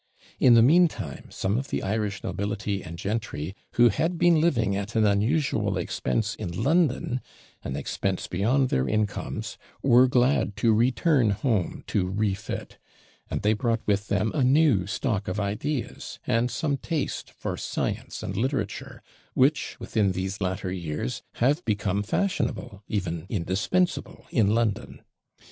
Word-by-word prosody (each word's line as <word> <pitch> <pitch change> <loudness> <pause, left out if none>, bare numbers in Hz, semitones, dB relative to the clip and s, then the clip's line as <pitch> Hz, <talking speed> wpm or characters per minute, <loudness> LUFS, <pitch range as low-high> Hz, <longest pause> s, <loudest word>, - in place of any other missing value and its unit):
In 125 -2 +7
the 115 - +7
meantime, 165 +6 +2
some 100 +5 -1
of 135 - -5
the - - -2
Irish 105 0 -2
nobility 100 +1 -2
and 85 0 -8
gentry 95 -4 -3 0.2
who 120 0 +6
had 165 - 0
been 170 -2 +4
living 115 -12 +2
at 100 +3 -4
an 110 -1 +4
unusual 105 - +1
expense 100 - -1
in 105 -5 -5
London 140 -5 +2 0.4
an - - -4
expense 95 -1 -2
beyond 125 +9 +1
their 65 0 +1
incomes 110 +1 -2 0.2
were 125 -1 +6
glad 125 -4 +2
to 115 -1 +3
return 120 +2 +3
home 100 -2 0
to 90 -3 0
refit; 100 0 -3 0.5
and - - -3
they 105 +1 +4
brought 115 +1 -1
with 100 0 +1
them 100 +2 +1
a 145 - +1
new 130 - +4
stock 105 -1 -1
of 90 +3 -2
ideas, 115 +7 -3
and 115 +2 +1
some 140 +3 -1
taste 160 +1 -3
for - - -5
science - - -3
and - - -4
literature, 125 -4 -3 0.3
which, 140 +4 +2
within 100 -4 +1
these 95 +2 -3
latter 95 0 -2
years, 75 -8 -3
have 145 +8 +1
become 100 -2 0
fashionable, 105 - -2
indeed 90 -4 -2
indispensable, 105 - -1
in 110 -3 +3
London. 115 -3 -1
110 Hz, 145 wpm, -26 LUFS, 100-130 Hz, 0.5 s, In